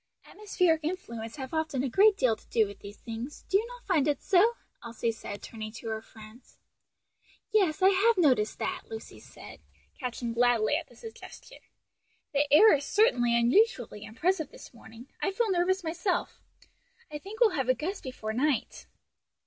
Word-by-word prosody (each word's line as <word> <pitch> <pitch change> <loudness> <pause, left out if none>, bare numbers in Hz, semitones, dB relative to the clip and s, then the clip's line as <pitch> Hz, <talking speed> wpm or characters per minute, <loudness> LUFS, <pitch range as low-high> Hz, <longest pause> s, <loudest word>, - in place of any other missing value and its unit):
"Atmospheric 365 -6 0
influences 235 -10 -5
have 265 0 -7
often 315 -5 -1
a - - 0
great 400 - +4
deal 250 -4 +2
to - - -23
do 220 - +3
with 200 -1 -10
these 205 +1 -11
things; 235 +5 -8
do 390 - +3
you 450 - -4
not - - -12
find 315 -7 +2
it 290 -2 +1
so?" 415 +5 +3 0.3
Elsie 230 0 -2
said, 205 -2 -8
turning 215 -1 -7
to 230 -1 -7
her 220 0 -3
friend. 220 +2 -14 1.1
"Yes, 385 -4 +2
I 380 - +8
have 400 +4 +3
noticed 255 -11 +2
that!" - - -3
Lucy 445 -1 -9
said, - - -13 0.4
catching 240 -2 -4
gladly 240 +1 +2
at 330 +1 -3
the - - -19
suggestion: 450 -2 -12
"and - - -33 0.7
the 285 0 +1
air 425 +10 +8
is 285 -1 +1
certainly 245 - +3
unusually 240 - +2
oppressive 320 +7 -1
this - - -14
morning. 230 +1 -14
I - - +1
feel 430 +2 0
nervous 370 +1 +1
myself. 345 +3 -2 0.7
I 295 - -5
think 405 +7 -10
we'll 465 -4 +5
have 265 -7 -2
a 255 - +4
gust 360 - -4
before 220 -4 -5
night." 270 +1 -1
290 Hz, 175 wpm, -28 LUFS, 235-380 Hz, 1.1 s, I